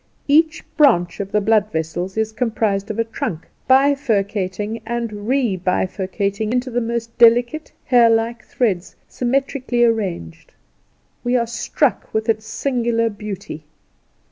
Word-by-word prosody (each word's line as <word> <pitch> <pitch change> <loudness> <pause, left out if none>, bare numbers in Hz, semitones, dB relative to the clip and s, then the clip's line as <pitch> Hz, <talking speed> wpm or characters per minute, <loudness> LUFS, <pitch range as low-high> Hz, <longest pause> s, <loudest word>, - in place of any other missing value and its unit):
Each 315 +2 +3
branch 175 - +3
of 200 -1 -4
the 210 - +2
blood 215 0 +2
vessels 175 +4 -3
is 220 0 0
comprised 220 -4 -1
of 215 - -4
a 230 - +2
trunk, 185 -7 -5 0.2
bifurcating 220 -7 +1
and 235 0 -3
rebifurcating 200 -2 -1
into 250 +1 -1
the 245 +1 0
most 230 0 -3
delicate, 240 +6 +4
hair 240 -2 +5
like 225 +1 0
threads, 200 -8 -1
symmetrically 255 -1 0
arranged. 195 - -2 0.7
We 245 +1 +2
are 235 - +1
struck 235 +1 -1
with 220 +1 -1
its 220 -1 0
singular 230 -2 0
beauty. 205 -7 -7
225 Hz, 125 wpm, -20 LUFS, 200-245 Hz, 0.7 s, hair